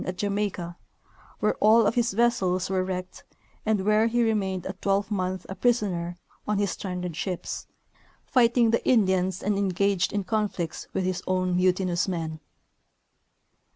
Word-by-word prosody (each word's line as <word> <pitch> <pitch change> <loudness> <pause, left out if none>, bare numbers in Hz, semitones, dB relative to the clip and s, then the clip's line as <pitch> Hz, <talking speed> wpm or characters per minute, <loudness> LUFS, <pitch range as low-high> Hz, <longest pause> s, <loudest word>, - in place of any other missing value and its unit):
at 185 0 -4
Jamaica, 200 -4 -2 0.6
where 210 - +3
all 220 +1 +6
of 205 - +2
his 235 -2 +1
vessels 195 -5 +1
were 185 -1 +1
wrecked 185 0 -5 0.4
and 210 -3 +1
where 215 +2 +4
he 240 +1 +2
remained 195 -5 0
a 190 - -3
twelvemonth 195 -1 -1
a - - -5
prisoner 185 -6 0 0.3
on 210 -1 +1
his 200 -1 +1
stranded 180 -3 -4
ships, 180 0 -4 0.6
fighting 235 -2 +3
the 230 - +1
Indians 190 -5 +2
and 205 0 +1
engaged 200 -1 +1
in 205 -1 -1
conflicts 190 -4 -2
with 190 - -1
his 185 -1 -1
own 185 -1 +1
mutinous 180 0 +1
men. 165 -4 -3
190 Hz, 145 wpm, -26 LUFS, 180-210 Hz, 0.6 s, all